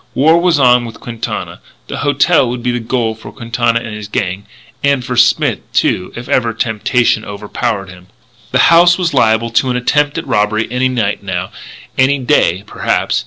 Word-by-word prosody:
War 160 +5 +4
was 175 -3 +2
on 125 -3 +4
with 115 - -9
Quintana. 115 -2 -6 0.3
The - - -5
"hotel" 145 -1 +2
would 120 0 -5
be 125 - 0
the 120 - -2
goal 115 -1 -1
for 110 - -12
Quintana 115 -1 -1
and 115 - -7
his 105 -1 -7
gang. 100 -3 -3 0.4
And 140 -3 +1
for 125 -1 -3
Smith, 120 - +3
too, 90 - 0
if 120 +1 -8
ever 115 -3 0
temptation 115 0 0
overpowered 100 0 -4
him. 90 0 -15 0.4
The - - +4
house 175 +1 +6
was 175 -4 -1
liable 115 -2 +2
to 130 +3 +1
an 125 - 0
attempt 145 +4 +1
at 165 - -4
robbery 105 +1 0
any 130 +1 +1
night, 110 -5 -1
now; 95 -2 -4 0.5
any 135 +2 +4
day, 120 - +1
perhaps. - - -1
120 Hz, 180 wpm, -15 LUFS, 110-130 Hz, 0.5 s, house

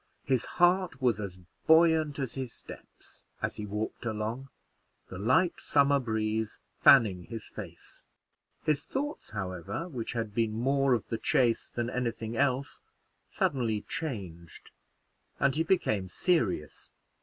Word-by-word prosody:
His 130 -3 +1
heart 175 -5 +3
was 120 -5 +2
as 100 -3 -5 0.3
buoyant 160 -2 +5
as 135 -4 -3
his 130 -3 -4
steps, - - -13 0.2
as - - -3
he 105 - -5
walked 105 +4 -4
along, 115 +4 -3 0.6
the 90 - -7
light 130 - +2
summer 140 -1 +3
breeze 110 -2 -1 0.2
fanning 100 -9 +6
his 115 -2 -7
face. - - -9 0.6
His 150 -1 +1
thoughts, 290 +3 -4
however, 95 - -4
which 125 -10 -5
had 115 -3 -3
been 115 -1 +1
more 135 +3 +2
of 110 -3 -5
the 115 - -2
chase 120 -3 +2
than 120 +1 -3
any 125 -2 0
thing 115 0 -6
else, 140 +1 0 0.5
suddenly 115 -6 0
changed, 95 - -6 0.7
and 140 +1 +2
he 160 - +1
became 135 - +1
serious. 110 - 0
120 Hz, 135 wpm, -30 LUFS, 110-140 Hz, 0.7 s, fanning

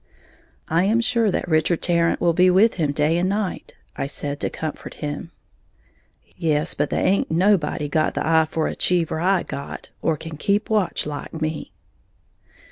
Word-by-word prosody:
"I 170 +3 +2
am 220 +4 +3
sure 230 -1 +2
that 180 - -1
Richard 160 +1 +1
Tarrant 170 -1 +2
will 170 -1 +2
be 180 +2 +5
with 195 +5 +4
him 150 -2 +2
day 150 +3 +1
and 185 +2 +1
night," 200 -1 -3 0.2
I - - -2
said, 145 0 -4
to - - -1
comfort 155 -1 -6
him. 145 +2 -5 1.1
"Yes; 155 -3 0
but 145 0 -1
tha'in't 195 - +1
nobody 165 -4 +2
got 155 +2 0
the - - -1
eye 160 0 +4
for 160 -1 -1
a - - -2
Cheever 170 -3 +1
I 185 +2 +2
got, 140 - -7
or 160 -2 +1
can 160 0 -8
keep 205 +6 0
watch 210 -4 +1
like 150 +2 -6
me." 155 0 -3
165 Hz, 170 wpm, -22 LUFS, 155-185 Hz, 1.1 s, be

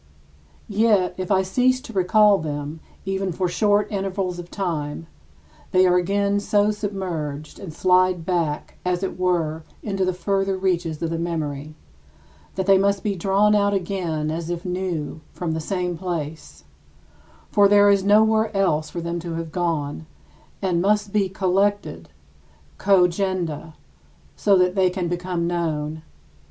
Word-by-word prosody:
Yet, 205 -3 +2
if 185 -1 -4
I 190 -2 +3
cease 255 +7 +2
to 255 -4 -10
recall 200 +2 +4
them 150 0 -5 0.3
even 195 0 -1
for 180 +2 -1
short 205 +3 +2
intervals 190 -2 -2
of 175 0 -8
time, 165 -6 -3 0.7
they 185 0 +5
are 180 -1 +4
again 200 +3 +1
so 205 +1 +2
submerged 175 -8 -4
and 190 -5 -7
slide 180 0 +2
back, 165 -5 -2
as 180 +1 -1
it 190 - -4
were, 165 -3 0 0.2
into 195 -3 -1
the 185 - +1
further 195 +1 -1
reaches 170 -4 -1
of 165 - -1
the 165 - -2
memory 155 -3 -4 0.8
that 190 - -1
they 195 0 +5
must 200 0 +1
be 205 -2 -1
drawn 195 +3 +3
out 200 -1 +3
again 170 -5 -2
as 165 +1 -4
if 175 +1 -4
new 180 -5 -3
from 175 -2 -3
the 160 - -2
same 180 +1 -2
place 160 -4 -5 0.9
(for 205 -1 +5
there 205 0 +6
is 200 -1 +3
nowhere 220 +2 +4
else 155 -6 +1
for 170 - -5
them 170 +1 -3
to 170 -1 -5
have 165 -1 -5
gone) 160 -3 -2 0.6
and 175 -3 +1
must 205 +1 +1
be 200 -3 +2
collected 190 - 0 0.7
[cogenda] 180 -4 +1 0.6
so 200 -2 +3
that 180 0 +3
they 190 -2 +3
can 180 -1 -3
become 175 0 -2
known. 160 -3 -2
180 Hz, 150 wpm, -23 LUFS, 165-195 Hz, 0.9 s, there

